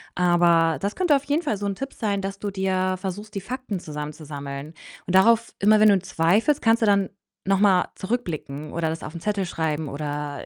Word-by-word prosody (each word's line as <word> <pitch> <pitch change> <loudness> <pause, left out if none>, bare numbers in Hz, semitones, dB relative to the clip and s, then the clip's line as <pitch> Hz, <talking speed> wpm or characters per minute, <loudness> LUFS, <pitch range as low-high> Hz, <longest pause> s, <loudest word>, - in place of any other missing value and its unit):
Aber 170 -3 +3
das 200 +5 -3
könnte 355 -6 +3
auf 275 - 0
jeden 295 +4 +1
Fall 220 -9 -1
so 205 - -4
'n 200 - -1
Tipp 270 +6 -6
sein, 200 -3 -1
dass 195 0 -4
du 205 -1 -3
dir 185 -1 0
versuchst, 205 +3 -5
die 195 - -2
Fakten 245 -3 -5
zusammenzusammeln. 150 -1 -7 0.3
Und 185 - 0
darauf 230 +4 +4
immer 215 +2 +5
wenn 215 0 +7
du 200 - +5
zweifelst, 195 - +1
kannst 225 0 +3
du - - +5
dann 200 -2 +3 0.4
noch 195 0 +3
mal 190 -3 +4
zurückblicken 160 - -4
oder 165 -1 -1
das 160 0 -5
auf 155 - -7
'n 165 - -7
Zettel 205 -3 -1
schreiben 160 -3 -2
oder, 145 0 -4
190 Hz, 205 wpm, -24 LUFS, 160-210 Hz, 0.4 s, wenn